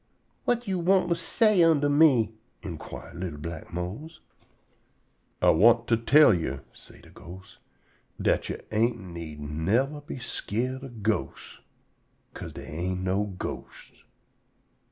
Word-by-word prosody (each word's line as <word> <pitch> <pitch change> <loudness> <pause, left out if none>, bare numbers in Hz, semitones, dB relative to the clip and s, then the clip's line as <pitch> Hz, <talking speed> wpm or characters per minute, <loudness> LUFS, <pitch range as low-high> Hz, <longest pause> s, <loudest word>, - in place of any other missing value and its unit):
"Whut 240 -1 +1
yo' 190 -2 -1
want 185 +1 +3
to 170 - +3
say 210 +2 +3
unto 160 -4 +4
me?" 145 -7 +4 0.3
_in_quire 85 -5 -8
li'l 85 -4 -5
black 80 +1 -7
Mose. 95 - -6 1.2
"Ah - - +7
want 115 +7 +5
to 115 - +5
tell 125 +4 +6
yo'," 70 -6 -2
say - - -16
de - - -17
ghost, 95 +2 -13 0.6
"dat - - +1
yo' - - -3
ain't 115 +2 +2
need 85 -5 -8
yever 100 - 0
be 145 - -7
skeered 125 +2 -3
of 120 -6 -9
ghosts, 110 0 -2 0.7
'ca'se - - -8
dey - - -9
ain't 90 +4 -3
no 95 +2 0
ghosts." - - -8
115 Hz, 135 wpm, -27 LUFS, 90-145 Hz, 1.2 s, Ah